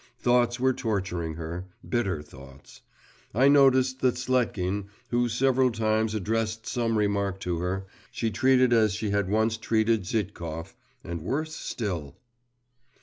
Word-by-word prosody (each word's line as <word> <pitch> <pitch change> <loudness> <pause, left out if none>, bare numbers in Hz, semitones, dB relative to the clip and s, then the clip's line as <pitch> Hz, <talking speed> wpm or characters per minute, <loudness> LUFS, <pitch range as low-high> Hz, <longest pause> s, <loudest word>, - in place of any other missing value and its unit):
Thoughts 120 0 +2
were 130 +1 +3
torturing 95 -9 -2
her… 85 +3 -6 0.2
bitter 95 -11 -1
thoughts. 70 -2 -15 0.5
I 130 +4 +5
noticed 130 -2 +4
that 125 -1 +3
Sletkin, 105 -6 0 0.2
who 120 0 +2
several 130 +2 +3
times 110 0 0
addressed 110 +2 -1
some 115 -2 0
remark 100 -2 0
to 85 -2 -2
her, 95 +2 -2 0.2
she 115 -1 -2
treated 130 0 +4
as 110 -4 +3
she 105 -1 -2
had 100 -2 0
once 110 +2 +1
treated 110 0 +1
Zhitkov, 85 -6 -4 0.3
and 85 -1 -5
worse 155 - -2
still. 90 - -4
110 Hz, 135 wpm, -27 LUFS, 95-120 Hz, 0.5 s, I